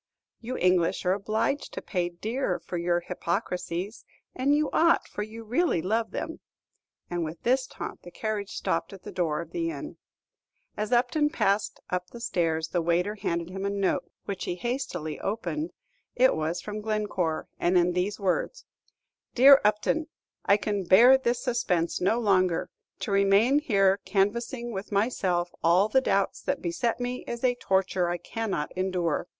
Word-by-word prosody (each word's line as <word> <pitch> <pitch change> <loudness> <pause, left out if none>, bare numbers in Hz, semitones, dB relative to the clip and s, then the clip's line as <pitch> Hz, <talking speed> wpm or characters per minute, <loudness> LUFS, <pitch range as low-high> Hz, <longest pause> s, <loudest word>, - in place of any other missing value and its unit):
"You 245 +2 -5
English 180 -1 +2
are 180 - +3
obliged 215 +8 -1
to - - -4
pay 180 -3 -1
dear 215 +3 -2
for - - -7
your 175 0 +1
hypocrisies; 180 +2 -3 0.3
and 275 +3 +2
you 300 -1 +1
ought, 335 +1 +4
for - - -5
you 220 +2 -7
really 245 - +1
love 220 +7 0
them." - - -5 0.7
And 175 -1 -1
with 160 +1 -6
this 255 +1 +2
taunt - - -7
the 175 - -11
carriage 210 +1 -3
stopped 165 - -2
at 195 - -12
the - - -7
door 165 -3 -1
of 170 - -10
the 335 -1 -1
inn. 330 - -7 0.8
As 210 0 -3
Upton 250 +5 +3
passed 200 -7 0
up 180 0 -2
the 235 - -10
stairs, 160 -7 -1
the 175 - 0
waiter 175 +4 +1
handed 170 -4 -3
him 190 +1 -5
a 200 - 0
note, 200 -1 0 0.2
which 200 -2 -4
he 175 - -2
hastily 180 - -3
opened; 230 - -3 0.4
it 260 +1 +4
was 160 +2 -2
from 210 0 -5
Glencore, 210 -7 -1
and 180 +1 +3
in 175 0 +3
these 185 +3 -1
words: 195 - -1 0.7
Dear 275 +2 +8
Upton, 215 +9 +1 0.4
I 200 - +4
can 205 -2 -2
bear 235 +9 +7
this 245 -2 0
suspense 225 -10 0
no 210 +6 +2
longer; 185 -6 +2 0.3
to - - -3
remain 200 +7 +4
here 195 -8 +3
canvassing 235 +5 -1
with 195 0 -6
myself 190 -5 0
all 180 +5 +4
the 265 +4 +4
doubts - - 0
that - - -1
beset 260 -10 -1
me 245 +1 -3
is 235 +1 -5
a 250 -1 +4
torture 190 -5 0
I 175 - -1
cannot 200 -6 -3
endure. 180 -3 -1
200 Hz, 165 wpm, -27 LUFS, 180-235 Hz, 0.8 s, Dear